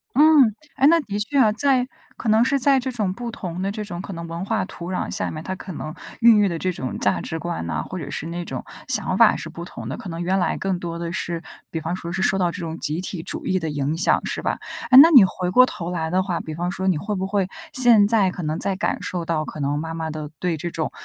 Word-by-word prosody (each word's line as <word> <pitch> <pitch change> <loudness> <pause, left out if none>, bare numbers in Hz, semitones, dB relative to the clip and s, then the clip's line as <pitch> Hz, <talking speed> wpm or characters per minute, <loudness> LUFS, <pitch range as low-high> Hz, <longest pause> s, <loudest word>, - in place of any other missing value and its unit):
嗯， 290 -6 +6 0.2
哎， 275 - +3
那 335 +1 +5
的 205 -8 -4
确 250 +7 0
啊。 220 -5 +5
在 255 +1 +2 0.3
可 235 - -5
能 220 +2 +5
是 275 +1 +1
在 275 +1 +4
这 260 0 -2
种 210 -6 -1
不 240 +2 -5
同 185 -5 -6
的 195 - -1
这 215 +1 -5
种 180 -3 -6
可 195 - -8
能 170 0 -6
文 170 +2 -5
化 220 -1 -1
土 175 -1 -8
壤 185 - -2
下 - - 0
面， 155 - -6
它 190 - -4
可 185 0 -8
能 155 +1 -6 0.3
孕 230 -2 +7
育 205 -1 +4
的 170 -2 -3
这 185 +1 -1
种 130 -6 -5
价 - - +1
值 160 - -4
观 170 - -4
呐， 80 -2 -2
或 185 - -6
者 145 - -6
是 150 - -4
那 170 +1 -4
种 130 -5 -5 0.3
想 - - +2
法 - - +6
是 - - -6
不 170 - -8
同 120 -9 -8
的。 130 - -4
可 190 - -9
能 165 0 -5
原 185 +2 +1
来 180 - 0
更 190 -2 -1
多 170 -1 -5
的 170 0 -4
是， 170 -1 -3 0.3
比 160 - -3
方 165 +3 -3
说 170 -1 -6
是 190 +1 -2
受 195 - +2
到 180 -2 +1
这 180 - -8
种 165 -2 -5
集 155 +3 -1
体 180 -2 -3
主 - - -4
义 185 - +1
的 160 -1 -3
影 145 +2 -2
响， 175 - +3
是 - - -3
吧？ - - -1 0.3
诶， 255 - +9
那 325 +4 +9
你 255 -10 +9
回 180 -1 -2
过 250 +7 +7
头 175 -8 -4
来 160 -2 -2
的 185 +1 +2
话， 180 -3 -2
比 155 - -6
方 175 +3 -2
说 190 0 -3
你 175 -5 +2
会 210 +5 -3
不 190 -1 -2
会， 195 -1 0 0.2
现 235 -5 +5
在 210 -5 +3
可 180 - -7
能 155 0 -2
在 195 - +3
感 200 - -1
受 175 -2 -4
到 160 -2 -1
可 150 - -8
能 140 +1 0
妈 160 +1 -5
妈 160 -1 -4
的 155 -1 -6
对 175 -3 0
这 175 +2 -4
种 160 -1 -3
180 Hz, 300 characters per minute, -22 LUFS, 165-210 Hz, 0.3 s, 诶